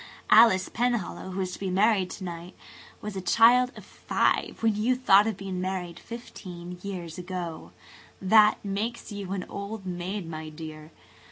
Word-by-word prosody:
Alice 200 -5 +7
Penhallow, 235 -6 -2
who 190 +1 -3
is 185 -1 -2
to - - -8
be 195 - -2
married 195 0 +3
to 190 - -8
night, 175 0 -7 0.5
was 210 -1 -6
a 190 - -3
child 235 +7 +5
of - - -11
five - - -1
when 220 -2 +3
you 230 +5 +2
thought 210 -5 +5
of 220 -4 -2
being 190 -2 -4
married 180 -2 -4
fifteen 180 -7 -9
years 180 -4 -6
ago. 175 -3 -6 0.5
That 210 +2 +5
makes 215 +4 -3
you 200 -2 -6
an 190 -2 -3
old 200 0 -6
maid, 180 +1 -4
my 155 -1 -6
dear. 155 0 -9
190 Hz, 165 wpm, -27 LUFS, 180-215 Hz, 0.5 s, Alice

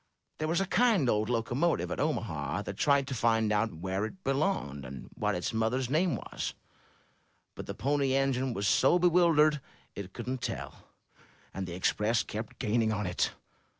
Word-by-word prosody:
There 155 - -1
was 170 +3 +1
a 195 - +1
kind 215 - +3
old 110 -1 +1
locomotive 120 +8 0
at - - -3
Omaha 100 - -1
that 100 - -6
tried 140 +1 +3
to 135 - -4
find 115 -2 +2
out 105 +1 +1
where 95 +4 -3
it 185 - -6
belonged, 135 - -1
and 65 0 -9
what - - -1
its 90 - -2
mother's 120 +3 0
name 165 0 +2
was, - - -5 1.0
but - - -8
the - - -5
Pony 140 +2 +1
Engine 135 -1 +1
was 100 0 0
so 135 - +4
bewildered 165 -4 +4 0.3
it 95 -2 -7
couldn't 125 +1 -4
tell. - - -5 0.7
And 95 -1 -4
the 85 - -5
Express 105 +5 +1
kept 110 +1 -6
gaining 110 +1 +1
on 105 -1 -1
it. 90 -1 0
120 Hz, 170 wpm, -30 LUFS, 105-145 Hz, 1.0 s, so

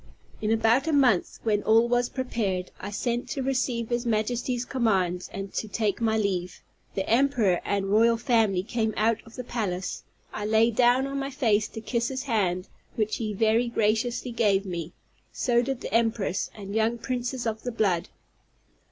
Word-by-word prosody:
In 215 - -1
about 225 +6 +3
a 320 - +1
month, 250 -10 +3
when 210 -2 +1
all 225 +2 +4
was 245 0 +1
prepared, 210 -8 -2
I 200 - -5
sent 240 +3 -2
to 275 -3 -2
receive 255 -3 -1
his 240 0 0
Majesty's 240 +2 -1
commands, 190 -9 0
and 195 0 -6
to 220 - -2
take 210 0 -1
my 220 -1 +2
leave. 185 -4 -2 0.3
The 195 - -2
emperor 230 -7 +3
and 200 -1 -1
royal 230 +2 +4
family 225 -7 +2
came 220 0 -1
out 220 +1 +2
of 225 - -14
the 250 - -5
palace; 195 -7 -3 0.3
I 210 - -3
lay 220 +2 +4
down 245 +3 +3
on 275 0 -3
my 275 0 -3
face 225 -7 +1
to 225 - -8
kiss 235 0 -1
his 260 -1 -3
hand, 190 -8 0 0.3
which 215 -1 0
he 220 -2 -3
very 225 +3 +2
graciously 235 +2 0
gave 205 -4 +2
me; 170 -3 -4 0.4
so 240 -2 +2
did 265 0 -3
the - - -6
empress, 225 -4 +1
and 200 -1 -7
young 225 +2 +1
princes 250 +1 -3
of 220 -1 -2
the 245 - -3
blood. 195 -7 0
225 Hz, 180 wpm, -26 LUFS, 205-245 Hz, 0.4 s, all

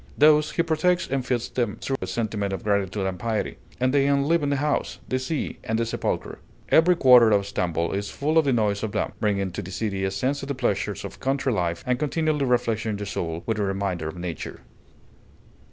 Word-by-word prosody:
Thus 150 0 +5
he 170 - +2
protects 170 +2 +1
and 135 -1 -1
feeds 120 -2 -1
them, 120 -5 -1
through 135 - -2
a - - -3
sentiment 105 -4 -2
of 95 - -5
gratitude 100 -1 0
and 95 -1 -3
piety; 115 -2 -2 0.2
and 130 +1 +1
they 140 -1 +3
enliven 140 +2 +2
the 140 - +1
house, 145 +2 -1
the 130 - 0
sea, 140 +4 -3
and 110 - -1
the 115 - +1
sepulchre. 115 - -3 0.3
Every 175 +3 +5
quarter 125 -7 +7
of 100 -2 +3
Stamboul 85 -3 -1
is 100 +1 -2
full 155 +3 +1
of 160 - +2
the 140 - +2
noise 105 -4 +1
of 110 -2 -3
them, - - -1
bringing 100 -3 0
to - - -4
the 90 - -8
city 100 0 -2
a 95 - +1
sense 130 +9 -1
of 135 - -6
the 140 - -2
pleasures 105 -5 -1
of - - -9
country 135 -1 0
life, 85 -4 -1
and 125 -1 0
continually 150 -1 0
refreshing 115 -3 0
the 105 - -5
soul 85 -4 -4
with 110 -2 -1
a - - +1
reminder 95 -4 -2
of 80 - -6
nature. 85 -3 -6
115 Hz, 215 wpm, -25 LUFS, 100-140 Hz, 0.3 s, quarter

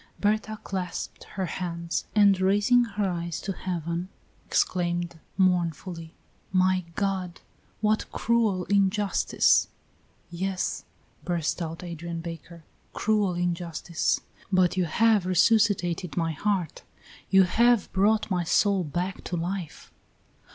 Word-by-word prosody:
Berta 215 +1 0
clasped 185 -3 -5
her 190 -1 -1
hands, 170 -1 -3
and 200 -3 +5
raising 205 +6 +4
her 205 -2 -2
eyes 170 -2 -3
to 195 - -4
heaven, 175 -1 -4 0.4
exclaimed 175 -2 0 0.2
mournfully: 175 -2 0 0.4
"My 185 -1 +2
God! 190 -3 -2 0.4
what 215 0 +1
cruel 220 -5 +1
injustice!" 200 0 +3 0.6
"Yes!" 185 +2 -2 0.4
burst 175 -1 -1
out 165 +1 -5
Adrian 170 -1 -5
Baker; 165 0 -8 0.3
"cruel 210 -4 +1
injustice! 175 -1 -1 0.3
but 185 -2 +3
you 185 -1 +1
have 210 +3 +3
resuscitated 185 -3 +2
my 165 -1 +1
heart; 180 0 -2 0.5
you 190 -1 +6
have 235 +3 +3
brought 210 +2 +2
my 180 -2 +1
soul 195 +2 +2
back 175 +5 -3
to 175 - -3
life." 175 0 -5
185 Hz, 110 wpm, -26 LUFS, 170-200 Hz, 0.6 s, you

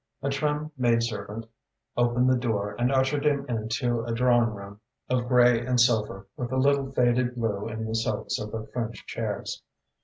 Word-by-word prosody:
A 140 - 0
trim 150 +2 -1
maid 120 -2 +3
servant 110 -1 -4 0.5
opened 120 +1 +2
the 130 - +4
door 105 -4 -1
and 125 +2 +2
ushered 135 +2 +1
him 140 -2 +1
into 115 +1 -1
a 115 - -4
drawing 120 0 +3
room 100 -1 -9 0.3
of 125 -1 +1
grey 120 -1 +5
and 125 0 +1
silver, 110 -5 +2
with 125 0 -4
a 130 - 0
little 140 0 +2
faded 125 -1 +2
blue 110 -4 -2
in 110 0 -4
the 110 - -4
silks 110 -2 -1
of 105 - -5
the 110 -1 -5
French 115 -1 -4
chairs. - - -4
120 Hz, 180 wpm, -27 LUFS, 110-130 Hz, 0.5 s, grey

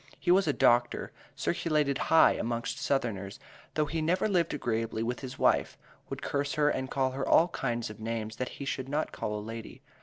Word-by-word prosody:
He 175 - +2
was 190 -1 +4
a - - +4
doctor, 120 -3 +2 0.2
circulated 150 -5 0
high 160 - +7
amongst 120 +4 -2
southerners, 115 -10 -2 0.4
though 155 - +2
he 160 +2 -2
never 180 +6 +1
lived 175 -5 +1
agreeably 115 -4 -2
with 120 +2 -2
his 130 -1 -7
wife, - - +2 0.3
would - - -6
curse 140 0 -1
her 150 -1 +3
and 130 0 -3
call 130 -1 0
her 135 +1 -3
all 170 +2 +6
kinds 120 -7 -2
of 105 - -12
names 110 -1 -4
that 125 - -2
he 140 - -5
should 135 -1 -3
not 150 +2 -1
call 105 0 -3
a - - -4
lady. 115 +1 -8
130 Hz, 195 wpm, -30 LUFS, 115-150 Hz, 0.4 s, high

